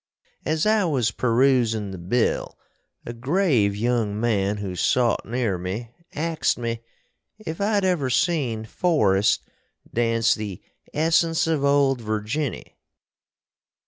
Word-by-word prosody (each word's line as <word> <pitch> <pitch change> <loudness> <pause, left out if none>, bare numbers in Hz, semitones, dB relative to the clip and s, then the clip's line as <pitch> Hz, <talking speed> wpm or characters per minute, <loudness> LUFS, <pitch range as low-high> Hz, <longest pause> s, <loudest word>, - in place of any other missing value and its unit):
As 155 +1 +1
I 215 -1 +3
was 130 -9 +1
peroosin 115 -3 +2
the 95 - -7
bill 110 +8 -1 0.5
a 120 - -5
grave 125 - +1
young 110 -2 0
man 105 -3 +1
who 100 -3 -5
sot 120 +5 +1
near 115 -6 -1
me 100 +6 -5 0.2
axed 165 +1 0
me 115 -1 -3 0.6
if 185 -5 -6
I'd 205 -1 +1
ever 170 -8 +1
seen 125 -7 0
Forrest 105 - +2 0.5
dance 115 0 +2
the 105 -4 -5 0.3
Essence 165 +1 +2
of 160 -3 0
Old 140 -3 +3
Virginny. 110 +6 -3
120 Hz, 115 wpm, -24 LUFS, 110-155 Hz, 0.6 s, I